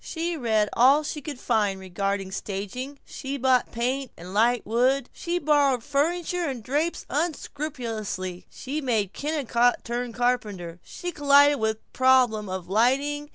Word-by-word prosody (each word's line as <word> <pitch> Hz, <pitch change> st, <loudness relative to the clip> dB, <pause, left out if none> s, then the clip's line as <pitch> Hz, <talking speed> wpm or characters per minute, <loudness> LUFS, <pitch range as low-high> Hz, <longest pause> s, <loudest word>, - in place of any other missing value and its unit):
She 335 Hz, +1 st, -3 dB
read 220 Hz, -7 st, +1 dB
all 275 Hz, +5 st, +5 dB
she 300 Hz, 0 st, -4 dB
could 285 Hz, -2 st, -7 dB
find 210 Hz, -5 st, +1 dB
regarding 195 Hz, +1 st, -3 dB
staging, 205 Hz, +9 st, -5 dB
she 275 Hz, +1 st, -5 dB
bought 255 Hz, -1 st, +2 dB
paint 255 Hz, +3 st, -1 dB
and 180 Hz, +3 st, -9 dB
light 235 Hz, +3 st, +2 dB
wood; 250 Hz, +3 st, +1 dB
she 345 Hz, +1 st, -2 dB
borrowed 285 Hz, -6 st, +2 dB
furniture 340 Hz, +5 st, 0 dB
and 250 Hz, -5 st, -5 dB
drapes 295 Hz, +8 st, -1 dB
unscrupulously; 240 Hz, -, -4 dB
she 290 Hz, +4 st, -5 dB
made 220 Hz, -7 st, 0 dB
Kennicott 255 Hz, -5 st, +1 dB
turn 240 Hz, 0 st, -3 dB
carpenter. 210 Hz, -9 st, -2 dB
She 355 Hz, -, -6 dB
collided 285 Hz, -1 st, +5 dB
with 220 Hz, 0 st, 0 dB
the -, -, -40 dB
problem 250 Hz, -6 st, +3 dB
of 185 Hz, -1 st, -5 dB
lighting. 275 Hz, +8 st, +1 dB
250 Hz, 145 wpm, -25 LUFS, 215-285 Hz, -, all